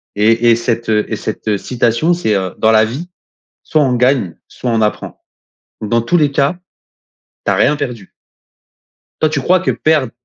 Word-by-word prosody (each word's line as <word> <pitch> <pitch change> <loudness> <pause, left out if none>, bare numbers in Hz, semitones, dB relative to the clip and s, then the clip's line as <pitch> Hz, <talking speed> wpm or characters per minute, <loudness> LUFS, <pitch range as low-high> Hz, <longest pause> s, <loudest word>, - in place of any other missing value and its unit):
Et 115 +3 +3
et - - +5
cette, 115 -1 -2
heu 105 -1 +2
et - - -2
cette 105 -2 -3
citation, 120 - 0
c'est 110 -12 0
heu: 95 -2 -2
«Dans 110 - +4
la 110 0 +5
vie, 140 +11 -6 0.6
soit 155 -2 +1
on 130 - +1
gagne, 125 -8 +1
soit 125 - -4
on 110 -1 +1
apprend. 105 - -3 0.6
Dans 115 +2 0
tous 165 +10 -1
les 150 -3 +2
cas, 140 +5 +1 0.9
tu - - +2
as - - +2
rien 150 - +3
perdu». 125 -8 -6 1.1
Toi, 155 - +3
tu 150 -2 -1
crois 185 +6 +3
que 185 - 0
perdre, 155 -6 +1
120 Hz, 180 wpm, -15 LUFS, 110-145 Hz, 1.1 s, et